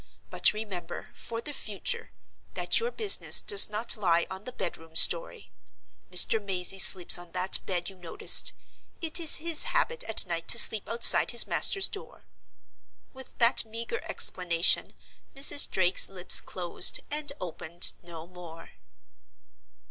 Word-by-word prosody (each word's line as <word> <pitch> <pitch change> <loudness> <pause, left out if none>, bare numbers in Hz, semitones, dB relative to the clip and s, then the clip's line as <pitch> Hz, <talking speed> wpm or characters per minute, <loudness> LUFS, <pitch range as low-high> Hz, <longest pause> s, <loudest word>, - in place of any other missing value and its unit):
But - - +1
remember, 190 -6 -10
for 230 0 -10
the 295 +5 -9
future, 270 - -7 0.5
that - - -1
your 465 +1 -5
business 435 -4 +3
does 415 - +1
not 215 +3 -3
lie 170 -5 -2
on 190 +3 -11
the 255 - -9
bedroom 165 -9 -9
story. - - +2 0.6
Mr. 205 +4 +3
Mazey 190 -1 -4
sleeps 180 -2 +6
on 175 -1 -15
that 185 +1 -2
bed 175 -2 -5
you 195 - -11
noticed. 175 -3 +2 0.5
It 330 0 -3
is 325 -3 +2
his 330 0 +2
habit 485 -1 -3
at 225 - 0
night 170 -2 -7
to - - +3
sleep 220 -3 +4
outside 235 0 +5
his 235 - 0
master's 390 -1 0
door." 405 - -13 0.9
With 265 -1 -16
that 235 +1 +1
meager 230 - -8
explanation 175 -2 -2 0.4
Mrs. 280 +1 +2
Drake's 185 -1 +1
lips 185 -2 +3
closed, 175 -2 -2
and 300 -1 -4
opened 170 -1 -2
no 170 -2 -13
more. 170 -2 -15
200 Hz, 140 wpm, -25 LUFS, 175-265 Hz, 0.9 s, sleeps